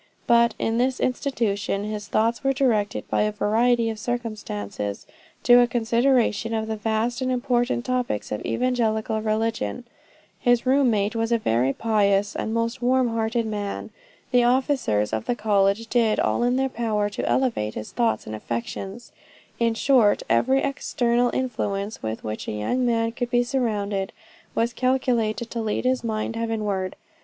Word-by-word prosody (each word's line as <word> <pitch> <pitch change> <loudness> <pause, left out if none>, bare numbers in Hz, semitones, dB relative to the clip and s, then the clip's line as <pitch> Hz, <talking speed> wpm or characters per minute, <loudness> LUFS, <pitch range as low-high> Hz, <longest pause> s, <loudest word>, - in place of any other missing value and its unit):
"But 235 -1 +4
in 225 +1 0
this 255 +1 +1
institution 225 -6 -1
his 210 0 -5
thoughts 230 +4 +1
were 270 0 +2
directed 230 -7 0
by - - +1
a 210 0 +1
variety 230 +3 +2
of 220 - -7
circumstances, 205 - -4 0.4
to 245 0 +7
a 245 - +5
consideration 230 -1 +1
of 220 0 -1
the 220 0 -3
vast 225 +4 -1
and 255 0 0
important 245 0 0
topics 250 - -2
of 105 - -3
evangelical 220 -3 0
religion. 215 - -1 0.6
His 245 -1 +2
room 265 0 +4
mate 210 0 0
was 225 0 -1
a 235 - +4
very 125 - +1
pious 205 +1 +1
and 220 - -2
most 230 +2 -1
warm 255 0 +2
hearted 225 +1 -1
man. 205 -2 -4 0.4
The 245 -1 +4
officers 245 - +1
of 110 0 -2
the 245 - 0
college 205 0 +2
did 225 -2 +2
all - - +1
in 245 +1 +2
their 265 +1 +1
power 220 -5 -1
to - - -3
elevate 230 - 0
his 110 - -6
thoughts 235 -1 0
and 110 - -5
affections. 190 - -5 0.5
In 230 -1 +2
short, 230 -4 +3
every 265 +2 +2
external 245 -3 +1
influence 215 -5 -2
with 110 0 -4
which 110 0 -5
a - - -3
young 245 - 0
man 230 -1 +1
could 240 +1 -3
be 245 0 +3
surrounded, 210 -6 -1 0.4
was 235 +1 +1
calculated 240 -3 0
to 230 - -2
lead 220 +2 -2
his 255 0 +1
mind 220 0 -2
heavenward. 210 -5 -2
230 Hz, 160 wpm, -24 LUFS, 210-245 Hz, 0.6 s, to